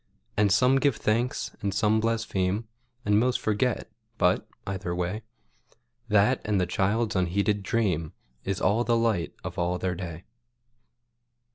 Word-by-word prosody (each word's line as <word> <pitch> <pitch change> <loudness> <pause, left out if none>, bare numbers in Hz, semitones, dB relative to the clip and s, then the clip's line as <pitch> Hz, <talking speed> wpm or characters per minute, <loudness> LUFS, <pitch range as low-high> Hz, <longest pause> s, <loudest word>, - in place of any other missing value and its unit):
And 105 0 +3 0.3
give 140 -5 +3
some - - -14
thanks, 120 +5 0
and 100 - 0
some 110 +1 +3
blaspheme, 110 -2 0 0.4
And 105 0 +4
most 125 +2 +2
forget, 110 +3 0 0.3
but, - - +2 0.2
either 95 -2 -3
way, 90 +5 -2 0.9
That 105 +4 +3
and 105 -2 +1
the 90 - +2
child's 105 +4 0
unheeded 100 +3 +1
dream 95 -8 0 0.3
Is 95 -1 -2
all 105 +5 +2
the 120 -1 +2
light 110 -7 0
of 90 +1 -5
all 90 +1 0
their 95 0 -1
day. 85 -2 -6
100 Hz, 140 wpm, -27 LUFS, 90-115 Hz, 0.9 s, And